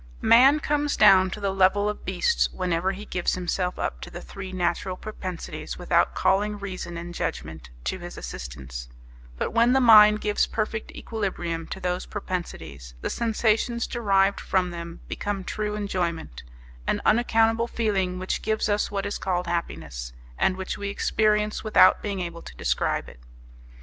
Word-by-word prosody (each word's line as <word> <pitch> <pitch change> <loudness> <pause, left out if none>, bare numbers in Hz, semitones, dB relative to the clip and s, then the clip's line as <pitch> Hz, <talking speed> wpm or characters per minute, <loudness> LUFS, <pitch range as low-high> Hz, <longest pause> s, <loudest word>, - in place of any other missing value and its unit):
Man 265 +6 +7
comes 295 0 0
down 190 -3 +7
to 200 - -6
the 200 -1 -1
level 195 +2 +3
of 210 - -4
beasts 470 -1 +1
whenever 180 0 0
he 205 +2 -8
gives 180 -4 -1
himself 180 0 -2
up - - -3
to - - -7
the 175 - -8
three 190 +1 -8
natural 185 0 -1
propensities 185 -5 -6
without - - +2
calling 205 +2 +1
reason 185 -4 -6
and 170 +1 -7
judgment 80 - -5
to 65 - -2
his - - -8
assistance; - - -7 0.5
but - - -2
when 235 +2 +4
the 265 - +4
mind 215 -3 +8
gives 210 -1 +1
perfect 220 0 -3
equilibrium 175 -7 -3
to - - -6
those 180 0 -2
propensities, 80 - -6
the - - -2
sensations 230 +1 +1
derived 200 -4 +2
from 185 -2 0
them 170 0 -7
become 205 -2 -3
true 210 +2 -3
enjoyment, 175 - -3 0.5
an - - +1
unaccountable 225 0 +3
feeling 195 -6 -1
which 185 +1 -2
gives 220 0 0
us 205 0 +1
what 200 -1 -3
is 205 - -3
called 180 -1 -1
happiness, 80 - -4 0.2
and 185 - +1
which 190 0 -4
we 200 0 -3
experience 210 +1 +1
without 215 - +5
being 200 -2 -3
able 170 -1 -5
to - - -12
describe - - 0
it. - - -13
190 Hz, 160 wpm, -25 LUFS, 175-215 Hz, 0.5 s, mind